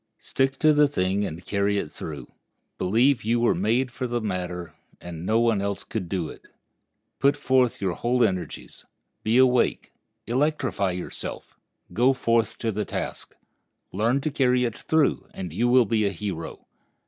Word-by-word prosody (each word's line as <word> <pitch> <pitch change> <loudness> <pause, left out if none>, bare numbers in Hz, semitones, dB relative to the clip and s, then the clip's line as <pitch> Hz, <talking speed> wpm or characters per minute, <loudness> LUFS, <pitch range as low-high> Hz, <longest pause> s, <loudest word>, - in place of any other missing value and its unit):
Stick 135 0 -1
to 155 +1 +4
the 150 0 +5
thing 100 -6 0
and 80 +3 -8
carry 100 0 0
it 80 - -3
through. - - -7 0.5
Believe 120 +8 +3
you 115 +2 +1
were 120 - +3
made 115 +7 +1
for 125 +1 -4
the 120 0 -1
matter, 90 -5 -4 0.3
and 85 -2 -8
that 85 - -7
no 110 +3 +2
one 115 -4 +2
else 100 -1 -2
could 95 -6 -5
do 90 -5 -1
it. - - -11 0.8
Put 140 +1 +3
forth 130 -4 +2
your 95 -3 -1
whole 120 +5 +1
energies. 95 -5 -3 0.4
Be 110 +3 +2
awake; 125 -2 +3 0.3
electrify 130 - 0
yourself; 90 - -6 0.4
go 125 +7 +4
forth 115 -3 +1
to 115 - -1
the 105 +1 -2
task. - - -5 0.6
Learn 115 +8 +1
to 155 - -2
carry 125 -3 +2
it 115 -3 -1
through, 160 -2 +1
and 90 -4 -6
you 120 +8 +1
will 125 0 +5
be 110 -1 +1
a - - -1
hero. 90 -3 -6
115 Hz, 170 wpm, -25 LUFS, 95-125 Hz, 0.8 s, the